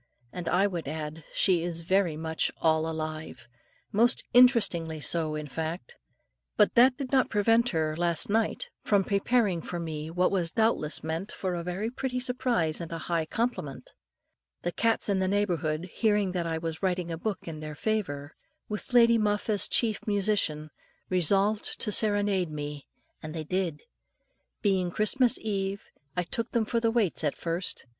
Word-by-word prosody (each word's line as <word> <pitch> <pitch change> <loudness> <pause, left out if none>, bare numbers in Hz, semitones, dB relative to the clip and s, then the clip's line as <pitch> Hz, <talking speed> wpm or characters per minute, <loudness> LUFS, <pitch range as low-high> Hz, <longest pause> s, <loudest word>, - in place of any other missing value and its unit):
And 175 -2 -4
I 190 +3 +3
would 175 -7 -3
add, 155 +1 -5
she 180 -3 +2
is 170 -1 -4
very 180 -2 +1
much 160 0 -1
all 160 0 +2
alive, 155 -5 -5 0.4
most 235 +4 +3
interestingly 205 -11 +4
so, 155 0 0
in 150 0 -4
fact. 160 +1 -5 0.6
But - - +4
that 250 +2 +5
did 275 -3 -5
not 265 -2 +3
prevent 225 +3 +3
her, 155 -4 -1
last 170 -1 0
night, 220 +1 -1
from 200 -2 +2
preparing 200 -2 +1
for 175 - -5
me, 160 -2 -5
what 180 +2 +1
was 180 -4 +1
doubtless 220 -7 +1
meant 165 +5 -3
for 185 -2 -3
a 170 - -2
very 185 +6 -3
pretty 255 0 -3
surprise 245 -11 0
and 170 - -7
a 165 - -3
high 165 -1 -2
compliment. 150 - -3 0.7
The 175 - -1
cats 225 +6 +1
in 200 -2 +1
the 190 - +1
neighbourhood, 175 -5 0
hearing 210 -4 +1
that 175 -2 -2
I 165 -1 -1
was 160 -1 -5
writing 180 -2 -1
a - - -2
book 210 -1 -4
in 160 -2 -6
their 155 -1 -7
favour, 155 -9 -2 0.3
with 210 +3 -4
Lady 235 -1 +6
Muff 210 +1 0
as 205 -1 +3
chief 220 -4 +2
musician, 195 -7 +1 0.4
resolved 195 +4 +2
to 210 - -1
serenade 205 -4 +2
me; 145 -1 -6 0.3
and 155 +1 -7
they 160 - -3
did. 170 -2 -2 0.8
Being 190 -3 +2
Christmas 225 +6 +2
eve, 195 -2 -3 0.3
I 180 - +2
took 230 +7 -4
them 230 -2 +2
for 230 +2 0
the 230 0 +2
waits 225 -9 +1
at 150 - 0
first. 170 -2 0
180 Hz, 170 wpm, -28 LUFS, 160-215 Hz, 0.8 s, Lady